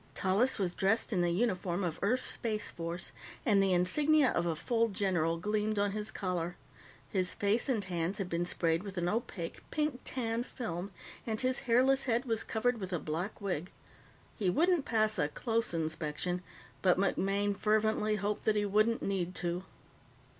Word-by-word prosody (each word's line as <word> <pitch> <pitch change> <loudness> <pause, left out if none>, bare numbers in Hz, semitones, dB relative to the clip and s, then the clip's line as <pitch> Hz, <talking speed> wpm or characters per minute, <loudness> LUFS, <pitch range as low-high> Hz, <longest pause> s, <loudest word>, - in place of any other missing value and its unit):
Tallis 205 +7 +2
was 185 -4 0
dressed 215 +5 +1
in 180 - +2
the 175 - +2
uniform 185 -2 0
of 170 -3 -2
Earth's 240 +6 +1
Space 215 -2 -2
Force, 170 +1 -5 0.3
and 205 -5 +4
the 195 -1 +3
insignia 285 - +4
of 175 - 0
a 165 - 0
full 230 +7 +1
general 180 -5 0
gleamed 210 +3 0
on 205 0 +2
his 210 +1 -2
collar. 180 -4 -2 0.5
His 185 -3 0
face 210 +6 +1
and 225 -6 +1
hands 175 0 -2
had 195 - -2
been 170 0 -1
sprayed 165 -1 +1
with 195 -1 -8
an 175 0 0
opaque, 200 -5 -3
pink 300 -5 -1
tan 230 -2 -2
film, 200 -8 -5 0.4
and 220 -1 -1
his 255 0 +2
hairless 265 +3 +4
head 240 0 +1
was 225 -3 0
covered 235 +1 0
with 190 -2 -5
a 175 - +1
black 165 +6 -4
wig. 185 -4 -2 0.7
He 195 -4 0
wouldn't 330 - +3
pass 215 -2 +2
a 145 - +3
close 230 - -1
inspection, 160 +2 -2 0.4
but 180 -2 +4
MacMaine 200 +1 +1
fervently 215 +1 +2
hoped 210 0 -2
that 215 - +3
he 205 0 +2
wouldn't 215 +3 +2
need 185 -2 -1
to. 175 +1 -2
200 Hz, 175 wpm, -32 LUFS, 180-225 Hz, 0.7 s, and